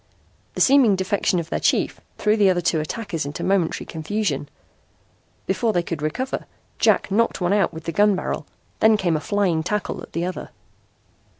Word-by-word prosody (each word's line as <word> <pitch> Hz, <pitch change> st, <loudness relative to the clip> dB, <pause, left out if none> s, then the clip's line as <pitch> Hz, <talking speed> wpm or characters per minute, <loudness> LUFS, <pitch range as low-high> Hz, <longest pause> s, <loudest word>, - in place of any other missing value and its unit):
The -, -, -2 dB
seeming 260 Hz, -7 st, +5 dB
defection 190 Hz, -1 st, 0 dB
of 165 Hz, -, -6 dB
their -, -, 0 dB
chief -, -, +1 dB, 0.2 s
threw 210 Hz, 0 st, +2 dB
the 205 Hz, -3 st, +4 dB
other 180 Hz, -1 st, +2 dB
two 170 Hz, -2 st, +1 dB
attackers 165 Hz, +1 st, -4 dB
into 145 Hz, +1 st, -5 dB
momentary 185 Hz, -4 st, 0 dB
confusion. 160 Hz, -4 st, -2 dB, 1.0 s
Before 230 Hz, -2 st, 0 dB
they 175 Hz, -, +1 dB
could 165 Hz, -3 st, -5 dB
recover, 205 Hz, -, -3 dB, 0.3 s
Jack -, -, +3 dB
knocked 230 Hz, +4 st, +1 dB
one 180 Hz, +1 st, +1 dB
out 205 Hz, -3 st, +2 dB
with 160 Hz, 0 st, -9 dB
the 165 Hz, -, -3 dB
gun 205 Hz, +4 st, +3 dB
barrel, 185 Hz, -, -4 dB, 0.3 s
then 220 Hz, 0 st, +5 dB
came 175 Hz, -5 st, +1 dB
a -, -, 0 dB
flying 180 Hz, -1 st, 0 dB
tackle 210 Hz, +5 st, -3 dB
at -, -, -12 dB
the 170 Hz, +1 st, -1 dB
other. 185 Hz, -, -5 dB
185 Hz, 180 wpm, -22 LUFS, 165-210 Hz, 1.0 s, seeming